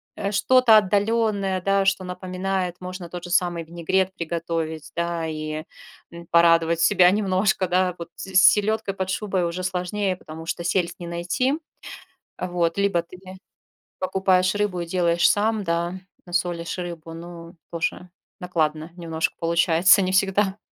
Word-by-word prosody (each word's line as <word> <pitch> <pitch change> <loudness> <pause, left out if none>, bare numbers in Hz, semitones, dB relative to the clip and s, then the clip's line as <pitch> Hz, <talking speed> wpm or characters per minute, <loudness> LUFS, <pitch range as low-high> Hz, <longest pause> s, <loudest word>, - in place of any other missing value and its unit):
э, 200 - -3
что-то 240 +1 +5
отдаленное, 205 -1 +1
да, 195 0 +2
что 195 -1 +1
напоминает. 185 0 -3
Можно 180 -1 -7
тот 175 0 -7
же 175 - -8
самый 175 -2 +1
винегрет 175 +3 -1
приготовить, 165 -2 -4
да, 170 -1 -2
и, 155 0 -4 0.5
м, 170 0 -11
порадовать 165 0 +4
себя 180 +1 +5
немножко, 195 -1 +1
да. 180 0 +1
Вот 170 0 -8
с 190 -1 -9
"селедкой 210 +2 +4
под 190 -1 -4
шубой" 190 -2 -1
уже 180 +2 -4
сложнее, 185 +2 -1
потому 160 -1 -10
что 170 +1 -4
сельдь 175 0 0
не 175 - -7
найти, 175 +10 -1 0.9
вот. 175 -1 -1
Либо 200 -3 +2
ты 175 +2 -14 0.8
покупаешь 185 0 +2
рыбу 205 -4 -1
и 170 - -4
делаешь 170 -1 +2
сам, 215 0 +1
да, 170 0 -1 0.3
насолишь 175 -1 -2
рыбу, 170 -2 -6
но, 170 0 -10 0.2
тоже 170 +2 -3 0.3
накладно 160 -3 -1
немножко 165 -2 -2
получается, 170 +3 +4
не 185 0 -1
всегда, 195 +1 +1
180 Hz, 140 wpm, -23 LUFS, 170-190 Hz, 0.9 s, что-то